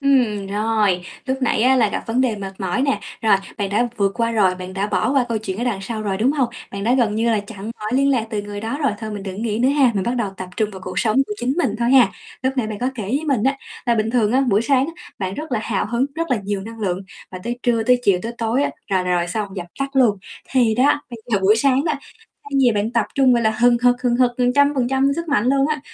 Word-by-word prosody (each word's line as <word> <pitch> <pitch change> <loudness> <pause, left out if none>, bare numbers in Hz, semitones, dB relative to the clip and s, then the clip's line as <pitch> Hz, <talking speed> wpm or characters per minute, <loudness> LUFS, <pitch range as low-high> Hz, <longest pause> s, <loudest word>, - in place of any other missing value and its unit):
Ừm, 245 -8 +2
rồi, 205 -3 0 0.2
lúc 265 0 -2
nãy 240 - +2
á 260 +2 +5
là 230 -4 +3
gặp - - -4
vấn 230 +3 0
đề 245 -4 +1
mệt 195 -1 -6
mỏi 190 +7 -1
nè, 275 -1 +1 0.2
rồi, 215 -3 +5 0.2
bạn 200 -2 -2
đã 235 +4 +1
vượt 200 -2 +1
qua 230 -1 0
rồi, 195 -5 +3
bạn 185 0 -8
đã 195 +1 -1
bỏ 210 +4 0
qua 270 -3 +3
câu 230 -2 0
chuyện 200 -2 -5
ở 240 - -1
đằng 235 -6 -1
sau 215 +2 -4
rồi, 200 -2 -1
đúng 235 +7 +2
hông? 270 -5 +1 0.2
Bạn 200 0 -5
đã 240 +3 +3
gần 235 -5 +2
như 230 +2 +1
là 215 - +2
chặn 205 0 -11 0.2
mọi 215 +2 -4
liên 275 +2 +3
lạc 240 -5 +1
từ 210 -2 -2
người 205 0 -6
đó 225 +6 -3
rồi, 275 -6 +2
thôi 220 0 -5
mình 205 -2 -5
đừng 195 +2 -5
nghĩ 220 -2 -1
nữa 250 +2 +3
ha, 275 -3 +4
mình 195 - 0
bắt 240 +4 -1
đầu 225 -5 -1
tập 185 0 -6
trung 215 -2 0
vào 190 -2 -9
cuộc 185 0 -4
sống 220 -1 +1
của - - -4
chính 260 -9 -1
mình 335 - +1
thôi 235 +1 +1
ha. 260 -3 +7 0.3
Lúc 260 +1 +1
nãy 250 -4 0
bạn 215 -1 -5
có 250 - 0
kể 230 - -5
với 250 +10 -1
mình 260 -7 +1
á, 270 +1 +2 0.3
là 235 - +3
bình 220 0 0
thường 230 -3 +2
á, 265 - +4
buổi 220 -5 +2
sáng 270 +1 +2
á 330 - -6 0.3
bạn 190 -1 -3
rất 310 +2 -6
là 225 - +1
hào 205 -4 -1
hứng, 235 +4 0
rất 330 0 -3
là 255 - +3
nhiều 200 0 -2
năng 225 +3 -9
lượng, 185 -3 -1 0.3
và 185 - -7
tới 240 +1 -3
trưa, 235 -2 +2
tới 250 +2 +3
chiều, 195 -3 +4
tới 230 - -4
tối 230 +4 +1
á - - 0 0.2
là 190 -2 +2
rồi 180 -1 0
xong, 200 +3 -3
dập 175 -2 -5
tắt 275 0 -3
luôn. 230 -6 +4 0.3
Thì 240 -4 +3
đó, 275 +5 +3
bây 235 - -7
giờ 205 - +4
buổi 205 +3 +5
sáng 270 +3 +2
đó, 315 - +1 0.5
thay 285 - -11
vì 245 -3 +5
bạn 210 +2 -1
tập 230 -3 +1
trung, 265 -2 +4
gọi 235 - +1
là, 220 - +3
hừng 240 +2 +3
hực 245 0 +3
hừng 245 -2 +2
hực 250 -1 +4
100% 265 +1 +2
sức 335 0 -4
mạnh 240 -6 +2
luôn 275 +1 +3
á, 305 -2 -1
230 Hz, 285 wpm, -20 LUFS, 205-260 Hz, 0.5 s, ha